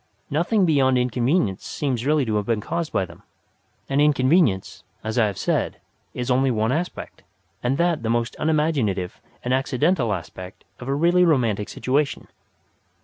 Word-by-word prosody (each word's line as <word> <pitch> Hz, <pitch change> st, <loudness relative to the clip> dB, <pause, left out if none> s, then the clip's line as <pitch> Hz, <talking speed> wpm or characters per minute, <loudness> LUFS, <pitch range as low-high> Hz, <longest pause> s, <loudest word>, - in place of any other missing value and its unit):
Nothing 180 Hz, +7 st, +2 dB
beyond 135 Hz, -5 st, +3 dB
inconvenience 125 Hz, -, 0 dB
seems 130 Hz, -3 st, -2 dB
really 150 Hz, -2 st, +3 dB
to 110 Hz, -2 st, -1 dB
have 105 Hz, -, -1 dB
been 115 Hz, -2 st, +1 dB
caused 165 Hz, +9 st, -3 dB
by 95 Hz, -, 0 dB
them; 85 Hz, -2 st, -15 dB, 0.7 s
and 140 Hz, +1 st, +1 dB
inconvenience, 140 Hz, -, +2 dB, 0.2 s
as 110 Hz, +2 st, -1 dB
I 110 Hz, -, +4 dB
have 100 Hz, -3 st, -5 dB
said, -, -, -1 dB, 0.4 s
is 125 Hz, +1 st, -2 dB
only 130 Hz, +2 st, +3 dB
one 110 Hz, -1 st, +1 dB
aspect, 170 Hz, +6 st, -4 dB, 0.4 s
and 125 Hz, +3 st, 0 dB
that 170 Hz, -3 st, +1 dB
the 115 Hz, -, -2 dB
most 115 Hz, 0 st, 0 dB
unimaginative 145 Hz, -, 0 dB, 0.2 s
and 125 Hz, -, 0 dB
accidental 135 Hz, -, +1 dB
aspect 90 Hz, 0 st, -7 dB, 0.2 s
of 125 Hz, -, -8 dB
a 135 Hz, -, 0 dB
really 175 Hz, +4 st, +4 dB
romantic 120 Hz, -, +1 dB
situation. 140 Hz, +2 st, -1 dB
130 Hz, 155 wpm, -23 LUFS, 110-150 Hz, 0.7 s, I